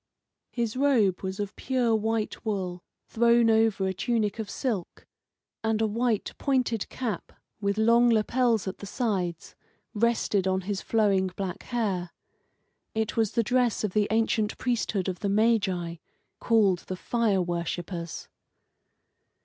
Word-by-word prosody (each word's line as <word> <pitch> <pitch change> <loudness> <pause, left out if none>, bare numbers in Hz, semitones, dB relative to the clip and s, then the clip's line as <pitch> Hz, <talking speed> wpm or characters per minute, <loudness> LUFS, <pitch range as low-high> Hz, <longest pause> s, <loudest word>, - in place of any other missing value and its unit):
His 235 -2 -2
robe 250 -9 +3
was 190 +1 -4
of 205 -1 -4
pure 245 -4 +1
white 220 0 -1
wool, 185 -5 -3 0.2
thrown 235 0 +4
over 220 -3 +3
a 190 - 0
tunic 215 +2 -1
of 215 -2 -4
silk; 215 -10 -3 0.6
and 220 -1 +1
a 220 - +2
white, 225 0 0
pointed 250 -6 0
cap, 230 -8 -4 0.3
with 200 0 -1
long 235 +2 +5
lapels 230 -1 +2
at 190 - -5
the 200 - -7
sides, 190 - -2 0.4
rested 215 -3 +1
on 190 0 +1
his 195 +1 -3
flowing 200 -4 +2
black 190 -3 -4
hair. 200 -8 -2 0.9
It 220 -1 -1
was 220 -3 +1
the 235 - +2
dress 245 0 +1
of 205 -4 -1
the 210 -1 +2
ancient 220 -1 +1
priesthood 220 -6 -1
of 185 -2 -3
the 200 - -1
Magi, 195 -6 +1 0.4
called 205 -6 +3
the 185 - -4
fire 225 -2 +1
worshippers. 170 0 -4
215 Hz, 140 wpm, -27 LUFS, 190-230 Hz, 0.9 s, long